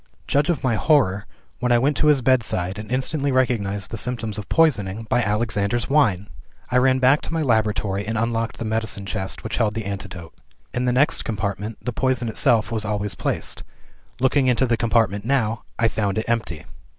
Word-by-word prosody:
Judge 145 +3 +1
of 170 -6 0
my 130 -3 +2
horror 110 -6 +2 0.3
when 125 0 0
I 120 - +6
went 140 +5 +2
to 150 - +2
his 145 -4 +4
bedside, 105 -7 +1
and 105 +2 -8
instantly 140 +2 0
recognized 105 -7 0
the 115 - -2
symptoms 115 -3 -2
of 105 - -9
poisoning 115 - +2
by 115 +2 +1
"Alexander's 105 +2 -1
Wine!" 105 -10 +2 0.4
"I 125 - +3
ran 130 +1 +4
back 130 +3 +4
to - - -5
my 165 -1 0
laboratory, 105 -5 0
and 110 0 -2
unlocked 115 0 -1
the 115 - -5
medicine 110 -2 -2
chest 95 -1 -4
which 110 -2 -3
held 105 -3 +1
the 110 -2 -3
antidote. 95 -4 -6 0.4
In 125 - -1
the 125 - +2
next 135 +4 +2
compartment, 105 +1 -3
the 125 - -2
poison 125 -1 0
itself 110 0 +2
was 110 -2 -1
always 105 -1 -2
placed. - - -2 0.6
Looking 130 +1 +2
into 125 +1 +3
the 120 -2 +1
compartment 115 -3 +1
now, 115 -3 0 0.2
I 115 - +3
found 105 -2 -1
it 110 - -2
empty. 110 -9 -2
115 Hz, 190 wpm, -22 LUFS, 105-130 Hz, 0.6 s, I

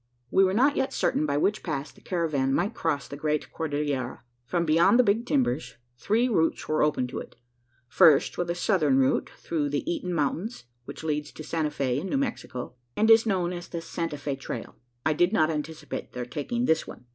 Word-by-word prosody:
We 195 - +5
were 190 0 +2
not 275 +6 +4
yet 265 - 0
certain 155 - +1
by 140 0 0
which 205 +8 +1
pass 145 -4 -4
the - - -20
caravan 150 -7 0
might 200 +6 0
cross 150 -8 -1
the - - -7
great 150 +1 -2
Cordillera. 145 -5 -2 0.3
From 170 +2 0
beyond 170 +8 +5
the 250 - +6
Big 225 +3 +1
Timbers, 205 - 0 0.2
three 220 - +1
routes 165 -9 +1
were 155 - +1
open 150 -4 +2
to - - -4
it. - - -10 0.5
First 140 +3 +5
was 175 - -2
the 170 - -1
southern 165 -8 +2
route 135 0 +2
through 150 -4 -2
the 145 - -2
Eaton 295 - -2
mountains, 165 - -2 0.2
which 140 +3 -8
leads 150 -1 -2
to 155 - -8
Santa 155 0 -1
Fe, 130 -3 -1
in 185 - -5
New - - +1
Mexico, 225 - -3 0.2
and 220 +2 +5
is 225 0 +6
known 180 -4 0
as 175 0 -6
the 170 - -5
"Santa 165 -2 -4
Fe 145 -1 -3
trail." 130 -3 -7 0.3
I 155 - +3
did 175 +4 +3
not 160 -5 +3
anticipate 155 0 -5
their 125 -1 -4
taking 235 - -2
this 160 -6 +2
one. 125 - -11
160 Hz, 205 wpm, -27 LUFS, 145-195 Hz, 0.5 s, the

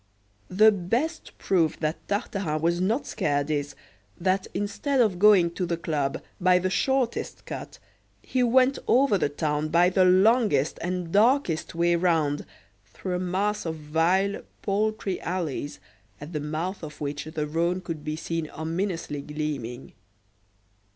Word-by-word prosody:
The 215 +4 +6
best 230 - -2
proof 170 -5 +1
that 155 0 -3
Tartarin 195 -6 -2
was 170 +2 +1
not 220 +9 0
scared 145 0 -1
is, 145 -1 -2 0.4
that 185 +2 +1
instead 205 +8 -1
of 210 -7 +2
going 195 -4 +6
to 180 +1 -3
the 170 0 -1
club 145 -5 -2 0.2
by 180 0 +4
the 185 +1 -1
shortest 265 +1 -1
cut, - - -7 0.5
he 255 - -1
went 255 +2 +4
over 255 -6 +4
the 145 - +1
town 150 +1 -1
by 175 +3 +4
the 185 0 +4
longest 185 - +3
and 180 -1 -3
darkest 210 - +2
way 170 +1 +3
round, 160 -4 +1 0.4
through 180 - -5
a - - -3
mass 190 +4 -1
of 165 -1 -3
vile, 165 +6 +1 0.2
paltry 205 -1 -1
alleys, 165 -5 -3 0.4
at 150 +4 -9
the 150 - -1
mouth 155 +6 -3
of 155 -2 -9
which 145 0 -4
the 155 -1 -3
Rhone 170 +4 0
could 165 -4 -6
be 155 0 -3
seen 160 0 -3
ominously 165 -2 -3
gleaming. 140 -5 -5
175 Hz, 145 wpm, -26 LUFS, 155-200 Hz, 0.5 s, The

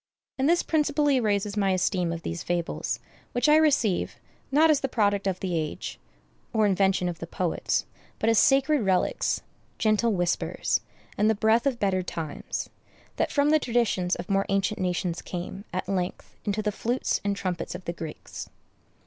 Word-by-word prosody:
And 270 +3 +3
this 345 +1 +3
principally 295 -3 +2
raises 205 -2 0
my 195 -2 +2
esteem 185 -1 +1
of 170 -1 -5
these 85 0 -4
fables, 175 -1 -2 0.3
which 245 +4 +2
I 300 - +7
receive, 270 - +2 0.4
not 310 +3 +6
as 295 - +3
the 270 - -1
product 205 -4 +1
of 185 -1 -1
the 180 -3 -1
age, 155 -2 -3 0.5
or 220 -2 +3
invention 195 -2 +2
of 170 -2 -4
the 165 - -6
poets, 175 -1 -1 0.3
but 220 - -1
as 225 -2 +5
sacred 275 +2 +4
relics, 190 -3 +1 0.3
gentle 220 +1 +2
whispers, 175 -2 0 0.4
and 210 +1 +4
the 220 - +3
breath 220 +5 +3
of 260 -3 +1
better 195 -4 +1
times, 160 -4 -4 0.5
that - - 0
from 290 +1 +3
the 310 - +5
traditions 230 -8 +1
of 175 - -6
more 195 -1 +1
ancient 195 +1 +1
nations 180 -2 -1
came, 185 +3 -6
at 185 - -3
length, 185 -2 -3
into 210 +1 -1
the 210 - +1
flutes 240 +5 -1
and 200 0 0
trumpets 185 -3 -3
of 180 - -8
the 170 - -2
Greeks. 160 -2 -7
200 Hz, 175 wpm, -27 LUFS, 180-240 Hz, 0.5 s, I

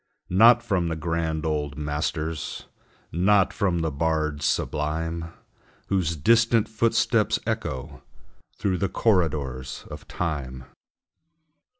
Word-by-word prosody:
Not 115 +5 +6
from 95 -7 0
the 80 - -2
grand 80 0 -2
old 75 -3 -2
masters, 75 +1 -3 0.5
Not 95 +3 +3
from 90 -4 0
the 80 -1 -1
bards 75 -1 0
sublime, 80 +3 -2 0.6
Whose 90 -4 +1
distant 115 +6 +3
footsteps 110 +1 +2
echo 65 0 -4 0.6
Through 95 -3 0
the 100 - 0
corridors 75 - 0
of - - -9
Time. 70 -7 -4
80 Hz, 100 wpm, -25 LUFS, 75-95 Hz, 0.6 s, Not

